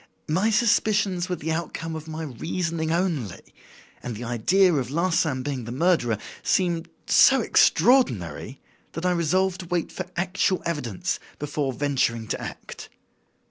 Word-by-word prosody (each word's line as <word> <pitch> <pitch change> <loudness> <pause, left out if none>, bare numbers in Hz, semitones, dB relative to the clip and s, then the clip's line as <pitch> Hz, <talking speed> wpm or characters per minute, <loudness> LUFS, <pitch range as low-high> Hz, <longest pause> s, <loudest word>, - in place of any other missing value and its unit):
My 185 +8 +2
suspicions 210 -5 +2
were 180 - 0
the 160 -1 -4
outcome 165 0 -4
of 160 0 -7
my 160 0 -5
reasoning 160 +4 -3
only; 165 - -2 0.5
and 120 -2 -5
the 115 - -7
idea 175 - +3
of 135 -5 -1
Larsan 160 -4 0
being 135 -4 -4
the 115 - -6
murderer 130 - +2 0.2
seemed 170 -2 0 0.2
so - - +6
extraordinary 125 - +2 0.3
that 165 - -4
I 180 - +3
resolved 180 +2 +1
to 180 - -8
wait 175 -1 -1
for - - -5
actual 185 +1 0
evidence 125 - -2 0.2
before 145 -1 -2
venturing 125 -4 0
to - - -2
act. - - -8
160 Hz, 140 wpm, -25 LUFS, 130-180 Hz, 0.5 s, so